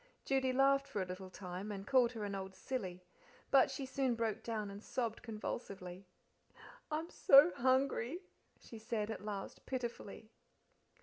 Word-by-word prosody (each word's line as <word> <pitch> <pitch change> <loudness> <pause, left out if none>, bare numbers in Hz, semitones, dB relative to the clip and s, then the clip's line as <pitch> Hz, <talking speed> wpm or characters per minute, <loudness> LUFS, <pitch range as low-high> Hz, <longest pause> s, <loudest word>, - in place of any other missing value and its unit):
Judy 265 -1 +2
laughed 275 +1 +4
for 210 -9 -2
a - - -5
little 185 +1 -7
time, 185 +2 -6
and 195 -1 -5
called 250 -1 +4
her 220 -3 -4
an 200 - -4
old 190 -1 -5
silly, 185 -4 -4 0.5
but 270 -2 +6
she 270 0 -4
soon 260 -2 0
broke 225 -2 -1
down 215 -3 -3
and 200 +1 -8
sobbed 235 -3 -2
convulsively. 195 -5 -6 0.8
"I'm 315 +2 -3
so 280 +5 +8
hungry," 260 - +1 0.4
she 225 - -11
said, 220 -1 -2
at 220 - -6
last 205 -2 -5
pitifully. 235 -4 -5
225 Hz, 150 wpm, -36 LUFS, 200-265 Hz, 0.8 s, so